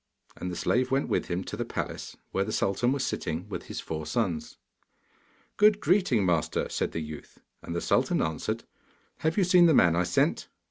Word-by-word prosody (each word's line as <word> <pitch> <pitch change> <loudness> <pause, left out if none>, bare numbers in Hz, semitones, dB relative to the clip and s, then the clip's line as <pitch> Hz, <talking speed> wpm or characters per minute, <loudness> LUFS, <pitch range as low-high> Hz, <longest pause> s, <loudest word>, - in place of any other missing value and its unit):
And 90 - -5
the 90 - -4
slave 125 +8 +1
went 135 +1 0
with - - 0
him 90 +1 -2
to - - -6
the - - -2
palace, - - -5
where 95 - +1
the 110 - -4
sultan 105 +5 +1
was 135 -1 0
sitting 85 -4 -3
with 100 - -6
his - - -5
four 80 -1 -5
sons. 80 -4 -2 1.0
'Good 210 0 +5
greeting, 175 - +2
master!' 85 -3 0
said - - -1
the 80 - -2
youth. 75 -1 -9 0.2
And 85 - -6
the 85 - -1
sultan - - +2
answered, 80 -1 -2 0.5
'Have 160 +3 -1
you 200 - +4
seen 180 -1 +6
the 160 - +5
man 85 -7 +5
I 90 - +2
sent? 90 0 +1
95 Hz, 195 wpm, -28 LUFS, 85-140 Hz, 1.0 s, seen